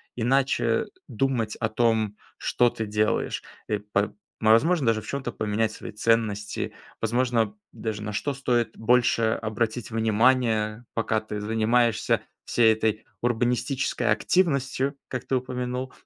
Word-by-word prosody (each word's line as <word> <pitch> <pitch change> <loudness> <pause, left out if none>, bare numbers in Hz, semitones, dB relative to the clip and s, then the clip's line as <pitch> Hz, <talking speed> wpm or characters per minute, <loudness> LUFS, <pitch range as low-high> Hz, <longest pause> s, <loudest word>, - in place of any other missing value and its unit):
иначе 135 +3 +2 0.2
думать 125 -5 -1
о 110 - +1
том, 110 -2 +1 0.2
что 120 0 +2
ты 115 - -4
делаешь, 105 +1 0 0.3
э, 105 -1 0
па 105 0 -1 0.3
возможно, 125 +7 +4
даже 110 -1 +2
в - - -13
чём-то 135 -3 -3
поменять 110 +1 0
свои - - -8
ценности, 105 -1 0 0.3
возможно, 115 -2 +1 0.2
даже 110 -2 -4
на 105 - -4
что 140 +7 -1
стоит 120 -4 0
больше 115 -1 +3
обратить 110 +1 -2
внимания, 115 0 +2
пока 110 -1 0
ты 105 -1 -5
занимаешься 115 +2 +2 0.2
всей 115 -2 +4
этой 110 0 -1 0.2
урбанистической 120 +1 0
активностью, 140 -5 +1
как 125 -1 -5
ты 130 - 0
упомянул. 125 0 -3
115 Hz, 125 wpm, -26 LUFS, 110-125 Hz, 0.3 s, возможно